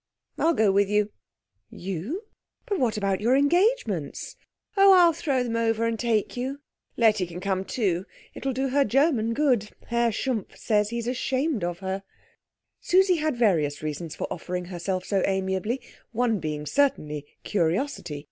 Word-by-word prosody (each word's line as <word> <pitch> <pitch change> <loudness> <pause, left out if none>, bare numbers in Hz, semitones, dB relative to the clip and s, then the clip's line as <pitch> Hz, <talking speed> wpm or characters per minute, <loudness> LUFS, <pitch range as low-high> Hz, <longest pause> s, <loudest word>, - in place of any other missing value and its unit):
"I'll 335 0 +3
go 215 -2 +4
with 200 0 +3
you." 210 0 +1 0.6
"You? 195 - -5 0.4
But 405 -6 -1
what 235 -4 +1
about 195 -1 0
your 240 +4 +3
engagements?" 415 - +1 0.4
"Oh, 390 -1 +7
I'll 350 -3 +6
throw 280 -5 0
them 235 -2 -3
over, 230 0 +1
and 230 -1 -1
take 225 -4 0
you. 260 +3 -3 0.4
Letty 215 -5 +3
can 175 +1 -7
come 190 0 -1
too. 190 -4 -1 0.3
It - - -9
will 270 - 0
do 265 +2 -1
her 280 +2 +3
German 250 -3 +2
good. 250 -8 +2 0.2
Herr 235 0 +2
Schumpf 230 -1 -3
says 210 -2 +1
he's 235 0 -3
ashamed 260 - -1
of 175 0 -2
her." 190 +1 -2 0.8
Susie 370 0 +3
had 305 -4 -1
various 160 -11 +1
reasons 155 +1 -4
for - - -3
offering 180 +1 -4
herself 185 +1 -2
so 195 -2 +1
amiably, 190 +5 -1 0.3
one 230 -2 +1
being 150 -2 -4
certainly 150 - 0 0.2
curiosity. 175 - -1
225 Hz, 155 wpm, -26 LUFS, 190-270 Hz, 0.8 s, Oh